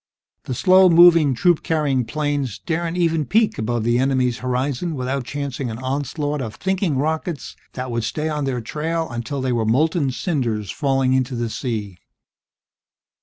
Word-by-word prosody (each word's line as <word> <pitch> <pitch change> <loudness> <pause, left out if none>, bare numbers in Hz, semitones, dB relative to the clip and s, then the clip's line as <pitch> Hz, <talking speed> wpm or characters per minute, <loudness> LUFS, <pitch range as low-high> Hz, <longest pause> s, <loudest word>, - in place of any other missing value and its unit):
The 130 - -3
slow 185 +6 +6
moving 165 -5 +6
troop 175 +6 +3
carrying 145 -6 0
planes 145 -4 -2
daren't 170 +1 -3
even 165 -3 +1
peek 220 0 +2
above 115 +1 -1
the 120 +1 +2
enemy's 130 -2 +1
horizon 130 +6 -2
without 130 0 -2
chancing 140 -1 -4
an 110 - -5
onslaught 145 +3 -2
of 110 -3 -5
"thinking" 190 - -1
rockets 160 +2 -2 0.2
that 125 -1 -5
would 115 -1 -1
stay 150 +7 -2
on 150 -2 -2
their 125 -3 -2
trail 160 +7 -2
until 120 +4 -4
they 130 -1 -1
were 120 -2 +1
molten 145 +6 +2
cinders 125 - -2
falling 135 -3 +1
into 130 -1 0
the 120 -1 -2
sea. 105 -9 -4
135 Hz, 160 wpm, -21 LUFS, 125-160 Hz, 0.2 s, slow